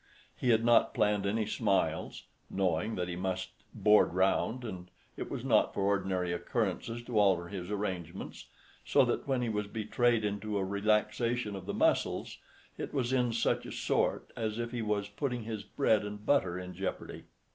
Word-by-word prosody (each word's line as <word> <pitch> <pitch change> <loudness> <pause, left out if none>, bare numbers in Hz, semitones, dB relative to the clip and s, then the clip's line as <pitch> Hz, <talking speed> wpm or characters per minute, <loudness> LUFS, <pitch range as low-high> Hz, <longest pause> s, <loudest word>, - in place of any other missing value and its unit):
He 125 - -1
had 115 0 +4
not 120 -1 +4
planned 105 -1 +2
any 110 +2 0
smiles 105 -2 0 0.3
(knowing 95 +3 0
that 90 -1 -2
he 90 - -4
must 95 +1 -3 0.2
"board 105 -4 +4
round"), 110 +6 +1
and 90 -5 -7 0.3
it - - -5
was 120 - -5
not 115 -5 +3
for 100 - 0
ordinary 95 -3 0
occurrences 115 +5 -2
to 120 -3 0
alter 95 -4 +3
his 95 -2 -6
arrangements; 95 -5 -4 0.4
so - - +4
that - - -1
when 130 -3 +1
he 120 - -1
was 105 -1 -2
betrayed 115 +1 +1
into 105 +1 -2
a 95 - 0
relaxation 105 +2 0
of 95 -2 -8
the - - -2
muscles, - - +1 0.4
it - - -5
was 130 -2 0
"in 125 -2 +2
such 115 - +1
a - - -7
sort" - - 0
as 110 -1 -2
if 120 0 -3
he 120 - -3
was 105 -2 -1
putting 125 +1 -3
his 110 -2 -4
bread 110 +1 +1
and 105 0 -7
butter 95 -11 +2
in 90 0 -6
jeopardy. 95 +2 -5
105 Hz, 180 wpm, -31 LUFS, 95-115 Hz, 0.4 s, had